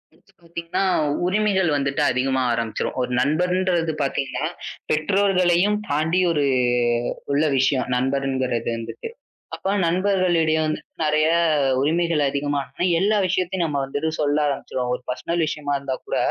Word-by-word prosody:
வந்து - - -29
பாத்தீங்கன்னா 170 +3 -3 0.4
உரிமைகள் 190 -2 +2
வந்துட்டு 140 0 -1
அதிகமா 130 +1 0
ஆரம்பிச்சிரும். 115 +1 -3
ஒரு 125 0 -2
நண்பர்ன்றது 175 +2 +1
பாத்தீங்கன்னா, 135 -1 -2 0.5
பெற்றோர்களையும் 190 +3 +2
தாண்டி 160 +5 +1
ஒரு 145 -3 +1 0.9
உள்ள 145 +2 +2
விஷயம் 130 -1 +1
நண்பர்ங்கிறது 130 -2 -1
வந்துட்டு. 115 - -7 0.5
அப்ப 195 - -2 0.2
நண்பர்களிடையே 175 -3 +2
வந்து 155 - -2 0.2
நெறைய 155 0 +2 0.5
உரிமைகள் 165 +2 +1
அதிகமா 145 +1 -1
ஆனா - - -5 0.2
எல்லா 210 +2 +2
விஷயத்தையும் 185 -1 0
நம்ம 145 -3 -1
வந்துட்டு 145 +4 -2
சொல்ல 145 0 +1
ஆரம்பிச்சிருவோம். 125 -3 -2
ஒரு 125 - -4
பெர்சனல் 165 +6 -1
விஷயமா 145 -2 -3
இருந்தாக்கூட, 135 -2 -4
155 Hz, 120 wpm, -22 LUFS, 135-180 Hz, 0.9 s, உரிமைகள்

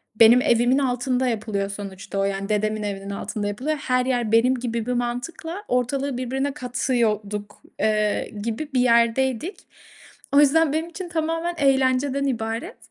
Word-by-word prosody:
benim 230 +3 +7
evimin 245 -1 +3
altında 255 -1 0
yapılıyor 210 -3 -2
sonuçta 195 -1 -6
o - - +2
yani. 195 +1 -2
Dedemin 215 0 0
evinin 200 -1 -4
altında 205 +1 -4
yapılıyor. 270 +9 -2
Her 255 -2 0
yer 240 -4 0
benim 245 +3 +4
gibi 235 -2 -3
bir 250 - -1
mantıkla 255 - -4
ortalığı 250 +2 0
birbirine 265 +2 -2
katıyorduk, 220 -6 -2 0.2
eee, 215 -1 +1
gibi 235 +7 -3
bir 255 - +2
yerdeydik. 250 - +2 0.8
O 280 - +7
yüzden 295 +1 +4
benim 320 +2 -1
için 350 +1 -7
tamamen 330 +1 -1
eğlenceden 270 0 +2
ibaret 225 -3 -3
245 Hz, 145 wpm, -23 LUFS, 215-275 Hz, 0.8 s, benim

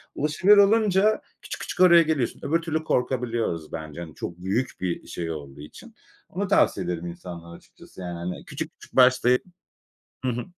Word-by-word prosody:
Ulaşabilir 170 +8 +4
olunca 210 0 +4 0.2
küçük - - -7
küçük - - -6
oraya 170 -2 +8
geliyorsun. 155 -7 -1
Öbür 165 +3 +1
türlü 160 -1 -2
korkabiliyoruz 120 - -1
bence, 80 0 -7
hani, 80 -3 -9
çok 85 - -6
büyük 100 +8 -1
bir 90 -2 -3
şey 85 -1 -4
olduğu 70 -3 -8
için. 75 - -13 0.3
Onu 195 +3 -3
tavsiye 95 - +2
ederim 85 -1 -3
insanlara 85 -1 -9
açıkçası, - - -16
yani, 90 -1 -5
hani, 90 +1 -6
küçük - - -6
küçük - - -16
başlayıp 125 -1 +5 0.8
Hı 130 - +2
hı. 120 +1 -4
120 Hz, 165 wpm, -25 LUFS, -, 0.8 s, oraya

